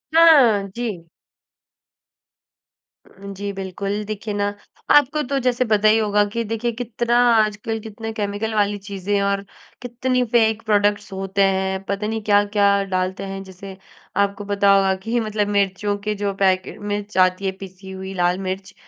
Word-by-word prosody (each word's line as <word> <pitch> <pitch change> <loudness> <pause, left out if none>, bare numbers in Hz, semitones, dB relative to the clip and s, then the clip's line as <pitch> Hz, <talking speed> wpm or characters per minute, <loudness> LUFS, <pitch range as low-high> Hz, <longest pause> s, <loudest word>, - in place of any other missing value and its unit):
हाँ, 270 -12 +6
जी। 215 -9 -4 2.0
उ, 200 +1 -10
जी, 200 +1 -5
बिल्कुल। 195 +2 -4
देखिए 215 0 -4
ना, 205 0 0 0.5
आपको 290 +2 +2
तो 275 - +2
जैसे 250 0 +2
पता 215 0 +4
ही - - +3
होगा 210 -1 +2
कि 230 0 -1
देखिए, 230 +1 -1
कितना 240 0 -1 0.2
आजकल 215 +1 0
कितने 225 +1 -6
केमिकल 210 +1 -3
वाली 205 -1 +1
चीज़ें 200 0 -5
हैं 200 - +1
और 200 0 0 0.4
कितनी 250 +1 -1
फ़ेक 220 -1 +3
प्रोडक्ट्स 205 0 +2
होते 195 +1 0
हैं, 190 0 -2
पता 200 +2 -2
नहीं 220 0 -3
क्या-क्या 205 0 +3 0.2
डालते 185 +1 -1
हैं। 195 - -5
जैसे 190 +1 -10 0.5
आपको 200 +1 -4
पता 200 0 +4
होगा 195 -1 +3
कि, 235 +3 0
मतलब 215 -2 -1
मिर्चियों 200 +1 0
के 210 - 0
जो 200 -1 0
पैकेट 185 -1 +1
मिर्च 205 -1 -5
आती 185 +2 -3
है, 190 - +1
पिसी 190 0 -11
हुई 190 0 -7
लाल 175 +1 +2
मिर्च, 190 +1 -5
205 Hz, 160 wpm, -21 LUFS, 195-220 Hz, 2.0 s, हाँ